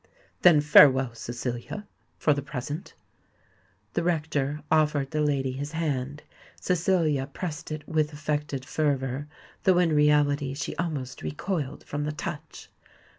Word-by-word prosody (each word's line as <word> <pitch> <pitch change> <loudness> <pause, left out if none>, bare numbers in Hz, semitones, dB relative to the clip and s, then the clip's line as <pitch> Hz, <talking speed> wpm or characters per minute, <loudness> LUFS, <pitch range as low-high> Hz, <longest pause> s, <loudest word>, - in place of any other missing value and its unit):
"Then 165 -5 +7
farewell, 135 -4 +6
Cecilia, 120 - -5 0.3
for 150 - +3
the 145 - -3
present." 145 +4 -6 1.0
The - - +1
rector 150 -4 -1
offered 150 -3 +2
the 155 -1 0
lady 140 -3 +1
his 145 +4 -5
hand: 145 -3 -2 0.4
Cecilia 165 -6 +1
pressed 160 -1 -5
it 155 -1 -6
with 155 -1 +1
affected 145 -2 -3
fervour, 140 -2 -1 0.3
though 185 -2 +4
in 175 -3 +3
reality 145 -2 +3
she 150 - -4
almost 145 -7 -3
recoiled 140 - -3
from 145 0 -3
the 150 - -1
touch. 150 +1 -7
150 Hz, 125 wpm, -27 LUFS, 135-155 Hz, 1.0 s, Then